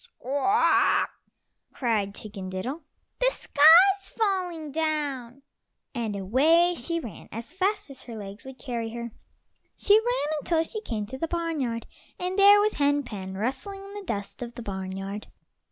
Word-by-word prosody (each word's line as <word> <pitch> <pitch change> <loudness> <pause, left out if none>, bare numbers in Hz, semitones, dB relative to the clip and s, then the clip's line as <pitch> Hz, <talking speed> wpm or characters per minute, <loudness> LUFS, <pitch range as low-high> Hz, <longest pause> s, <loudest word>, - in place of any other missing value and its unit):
"Squawk! 370 - -9
Squawk!" 390 - +3 0.6
cried 210 -5 -1
Chicken 200 -3 -7
diddle, 245 - -4 0.4
"the - - +4
sky's 380 +1 +6
falling 365 -8 -1
down"; 280 -5 -2 0.5
and 230 -5 -3
away 300 - +3
she 335 +5 -2
ran 225 - -9
as 230 +1 -6
fast 385 +4 -1
as 265 - -9
her 235 - -9
legs 200 0 -9
would 265 -1 -10
carry 235 -4 -4
her. 235 0 -5 0.7
She 410 - +3
ran 445 -11 -1
until 325 +2 +1
she 430 +6 -5
came 220 - -3
to 265 +5 -8
the 330 - -1
barnyard, 310 -9 -2 0.3
and 365 +2 -2
there 405 +1 +8
was 420 +1 +2
Hen 285 0 +2
pen 190 -5 -7
rustling 270 - -4
in 395 0 -11
the 410 - -6
dust 205 - -5
of 240 -1 -6
the 240 - -7
barnyard. 195 +1 -5
275 Hz, 155 wpm, -26 LUFS, 225-355 Hz, 0.7 s, there